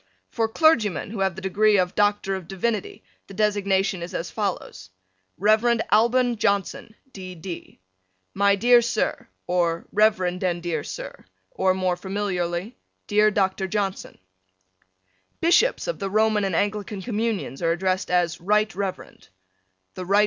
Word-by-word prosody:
For 225 -1 0
clergymen 220 - +2
who 220 - -6
have 190 -2 0
the 190 - -9
degree 205 +2 +3
of 180 -1 +1
Doctor 205 -1 +1
of 190 -3 -5
Divinity, 200 +2 -3 0.2
the 195 - -11
designation 200 -2 +1
is 175 +2 -6
as 170 - -4
follows: 180 - -4 0.5
Rev. 220 +4 +3
Alban 240 +2 +3
Johnson, 205 0 -1 0.2
D. 185 -2 -8
D. 170 +1 -9 0.5
My 200 0 +3
dear 240 +4 +5
Sir: 235 - -2 0.2
or 170 -2 0
Rev. 215 0 +3
and 180 -1 -1
dear 165 -4 -2
Sir: - - -8 0.3
or 190 -1 +1
more 185 -1 0
familiarly 190 +1 -3 0.3
Dear 210 0 +3
Dr. 190 -2 0
Johnson: 195 -1 -3 1.2
Bishops 350 +9 +3
of - - -3
the 195 - -3
Roman 215 0 +2
and 190 -3 -1
Anglican 205 0 -2
Communions 220 - -3
are 165 -1 +2
addressed 185 +2 -1
as 175 -2 +1
Right 210 +4 +1
Reverend. 195 -1 -6 0.7
The 185 - -6
Rt. 200 +2 +3
195 Hz, 140 wpm, -24 LUFS, 185-215 Hz, 1.2 s, dear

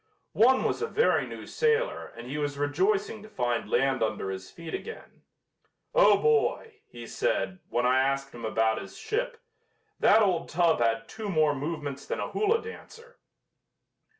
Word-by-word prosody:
One 255 +4 +4
was - - -1
a 455 - 0
very 460 +1 +2
new - - -8
sailor 470 +2 0
and 120 - -8
he 140 +4 -4
was 145 -1 -2
rejoicing 190 +9 0
to 215 - -12
find 120 - -2
land 135 -1 +1
under 110 -3 -1
his 95 0 -7
feet 165 -1 -9
again. 455 - -8 0.7
"Oh, - - +6
boy!" 450 0 +1
he - - -10
said, 195 - -1
when 120 +1 0
I 130 +1 +4
asked 135 +1 0
him 120 - -10
about 110 0 +1
his - - -11
ship, 455 +2 -3 0.6
"that 220 +2 +5
old 175 -4 0
tub 170 -3 +2
had 115 -1 +1
two 220 -2 -6
more 155 -5 +3
movements 145 -1 -5
than - - -3
a - - -4
hula 445 +2 +1
dancer." 460 +1 -12
165 Hz, 165 wpm, -28 LUFS, -, 0.7 s, Oh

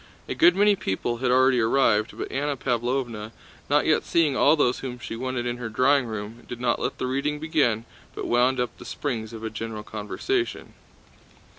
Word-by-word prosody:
A - - -2
good 340 +2 +5
many 205 0 +4
people 120 - -2
had 125 +1 0
already 130 0 +4
arrived, 110 -2 +2
but - - -5
Anna 140 +1 -1
Pávlovna, 120 -3 -2 0.4
not 145 +1 +3
yet 155 - +3
seeing 160 -5 +2
all 155 - +5
those 125 -5 +1
whom 125 -2 -5
she 115 -1 -6
wanted 125 0 -3
in 120 0 -2
her 120 -2 -5
drawing 130 +3 +3
room, 110 +2 -6
did 120 - -6
not 120 -1 +1
let - - -2
the - - -2
reading 140 +3 -1
begin 135 -8 +1 0.3
but - - -4
wound 125 +2 +2
up 125 -2 -2
the - - -9
springs 115 -6 -4
of 115 -1 -9
a 110 - -3
general 110 -1 -5
conversation. 230 - -3
125 Hz, 190 wpm, -25 LUFS, 115-140 Hz, 0.4 s, good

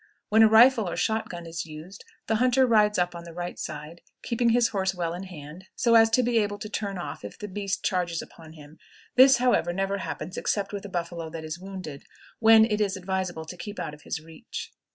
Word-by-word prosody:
When 220 +1 +5
a 220 - +9
rifle 225 -2 +6
or - - -4
shot 220 +5 0
gun 175 -1 -7
is 165 0 -5
used 160 +6 -10 0.2
the 220 - +1
hunter 255 +2 +4
rides 210 -3 +3
up 180 0 +1
on 170 0 -8
the 170 -1 -11
right 175 0 -5
side, 150 +3 -7 0.2
keeping 235 0 +1
his 235 0 +3
horse 190 -2 -1
well 170 -2 -2
in 180 +2 -6
hand, 165 0 -10
so 235 -2 +2
as 225 -1 +7
to 250 +3 +3
be 235 -1 +2
able 205 -1 -1
to 215 - -7
turn 200 -2 -3
off 175 - -6
if 100 - -8
the 210 - -6
beast 200 0 -3
charges 175 -3 0
upon 160 -1 -11
him; 150 0 -15 0.4
this, 265 +1 +8
however, 245 -8 +2
never 195 +2 -1
happens 180 -1 -6
except 200 -1 -1
with 205 0 -5
a - - -7
buffalo 170 -2 -4
that 160 0 -7
is 155 +2 -6
wounded, 185 -7 -8 0.4
when 225 0 +7
it 215 -2 -1
is 195 -2 0
advisable 185 -3 -3
to 170 - -8
keep 205 +3 -8
out 150 - -4
of 150 - -13
his - - -4
reach. 160 0 -9
190 Hz, 230 wpm, -26 LUFS, 170-220 Hz, 0.4 s, a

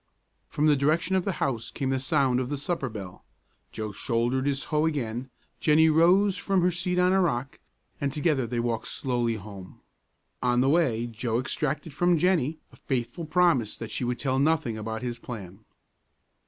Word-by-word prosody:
From 150 - 0
the 150 -1 +5
direction 155 +7 +1
of 185 - +1
the 195 - 0
house 120 -8 -2
came 135 -1 -2
the 135 - +1
sound 130 -2 +2
of 130 -1 -2
the 145 - -2
supper 140 -2 -2
bell. 95 -5 -9 0.5
Joe 110 -1 -4
shouldered 120 +5 -1
his 140 -1 0
hoe 155 +1 +3
again; 130 -4 -3 0.3
Jennie 160 +1 +5
rose 180 +5 +4
from 195 -3 +1
her 180 - +3
seat 180 +1 -2
on 180 +1 +4
a 190 - +4
rock, 135 -6 -1 0.4
and 140 -1 0
together 145 -4 0
they 120 +1 -2
walked 115 -1 -2
slowly 120 -3 -1
home. 100 -3 -10 0.6
On 125 -1 +2
the 130 +2 +3
way 135 -8 +2
Joe 115 0 -2
exacted 145 +4 -2
from 175 +3 +3
Jennie 160 -3 +1
a - - -17
faithful 125 +5 -3
promise 155 -9 +2
that 115 - -7
she - - -3
would 125 0 -1
tell 130 -1 0
nothing 140 -6 +1
about 110 +1 -5
his 120 -1 -4
plan. 100 -4 -9
135 Hz, 180 wpm, -27 LUFS, 120-160 Hz, 0.6 s, the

